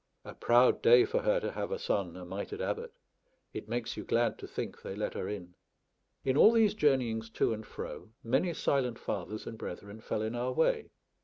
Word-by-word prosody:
A - - -8
proud 120 +1 +4
day 460 -4 +7
for 485 +4 0
her - - +2
to - - -3
have - - -3
a 485 - -1
son 95 - -1
a 90 - -8
mitred 95 +3 -5
abbot; - - -3 0.6
it 110 - -6
makes 120 0 -2
you - - -5
glad 120 0 +1
to - - -7
think - - -5
they 95 - -6
let 105 - -2
her 95 - -4
in. 90 -4 -6 0.7
In 130 -1 +2
all 215 - +8
these 225 -3 +4
journeyings 125 - +1
to 115 - +1
and 110 0 -6
fro, - - -7
many 135 +10 +1
silent 125 -4 0
fathers 105 +2 -4
and 115 - -7
brethren 100 +4 -7
fell 110 - -2
in 110 +1 -2
our 125 +1 -1
way. 160 - +1
120 Hz, 205 wpm, -31 LUFS, 105-150 Hz, 0.7 s, all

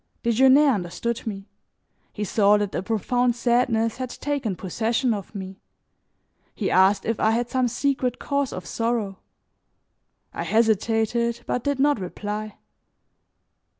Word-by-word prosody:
Desgenais 265 +5 +5
understood 220 +5 -3
me; 195 -2 -5 0.6
he 210 - -4
saw 205 +1 +4
that 205 -1 -2
a - - -1
profound 240 +4 0
sadness 235 -2 +1
had 255 -1 -4
taken 270 -7 -3
possession 230 +7 -1
of 205 +1 -7
me. 190 -1 -7 0.9
He - - -2
asked 190 +2 +4
if 225 -1 -1
I 220 - +3
had 235 +2 0
some 255 -1 +2
secret 250 0 -1
cause 280 -2 -1
of 185 - -7
sorrow. 225 -4 -2 1.1
I - - -4
hesitated, 225 +1 +1
but 250 - -2
did 285 -1 0
not 290 -3 +3
reply. 210 +3 -5
230 Hz, 130 wpm, -24 LUFS, 205-245 Hz, 1.1 s, Desgenais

